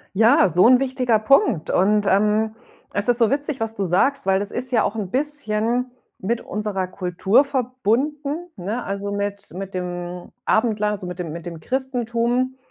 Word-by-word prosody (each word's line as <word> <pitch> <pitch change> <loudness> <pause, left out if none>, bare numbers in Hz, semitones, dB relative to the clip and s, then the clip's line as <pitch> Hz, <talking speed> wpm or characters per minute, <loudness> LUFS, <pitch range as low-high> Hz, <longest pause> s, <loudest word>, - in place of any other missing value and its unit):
Ja, 220 -2 +5
so 180 +5 +4
'n 255 +1 +6
wichtiger 255 -4 +1
Punkt. 215 - +3
Und, 205 +2 +3
ähm, 215 +3 +2 0.4
es 205 +3 -2
ist 245 0 +4
so 230 -1 +3
witzig, 285 -1 -2
was 225 0 -2
du 200 - -1
sagst, 190 +9 +1
weil 195 +1 +3
es 205 - -3
ist 250 +1 -5
ja 225 - +4
auch 215 - -2
'n 200 -4 -4
bisschen 250 -3 -1 0.3
mit 230 +5 -1
unserer 205 -3 -3
Kultur 185 +7 +2
verbunden, 280 - -1
ne, 205 +7 -3
also, 200 0 -3
mit 200 0 -4
mit 195 +1 -6
dem 175 -1 -5
Abendland, 215 -2 +2
also, 190 -3 -5
mit 180 0 -6
dem 165 -3 -4
mit 170 +2 -8
dem 170 -2 -7
Christentum, 250 0 -1
215 Hz, 175 wpm, -22 LUFS, 195-250 Hz, 0.4 s, n